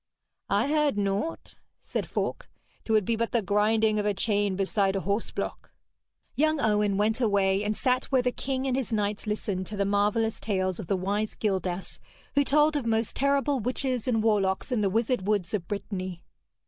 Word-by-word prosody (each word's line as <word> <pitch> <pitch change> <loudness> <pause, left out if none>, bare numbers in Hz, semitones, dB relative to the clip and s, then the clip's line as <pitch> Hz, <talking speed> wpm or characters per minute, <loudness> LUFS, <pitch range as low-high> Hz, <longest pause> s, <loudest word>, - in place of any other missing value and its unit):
'I 205 +6 +2
heard 300 -5 +2
naught,' 200 +10 -2 0.3
said - - -4
Falk. - - -3 0.4
''Twould 215 -3 +2
be 230 - +1
but 230 +1 -2
the 235 -3 +2
grinding 215 +2 +2
of 205 - -1
a 205 - +1
chain 205 -1 0
beside 195 0 +1
a 195 - 0
horseblock.' 200 +4 -3 0.6
Young 310 +1 +2
Owen 210 -4 +2
went 220 +4 +1
away, 200 -3 +2
and 210 0 -1
sat 255 0 +1
where 260 -2 +2
the 250 - +1
king 265 +1 -3
and 260 -2 +1
his 260 -2 -2
knights 210 -1 -1
listened 200 -3 -2
to 210 - -5
the 200 - +1
marvellous 210 +3 +1
tales 185 -4 -1
of 200 - -6
the 195 - +1
wise 205 +3 -1
Gildas, 190 -3 -2 0.3
who 285 - +4
told 300 +2 +3
of 275 -5 -1
most 225 0 0
terrible 280 0 +2
witches 255 +1 -2
and 225 -3 +1
warlocks 205 0 +1
in 240 -4 +1
the 200 - +2
wizard 225 0 0
woods 205 -4 0
of 185 -5 -2
Brittany. 185 -3 -5
210 Hz, 185 wpm, -27 LUFS, 200-245 Hz, 0.6 s, who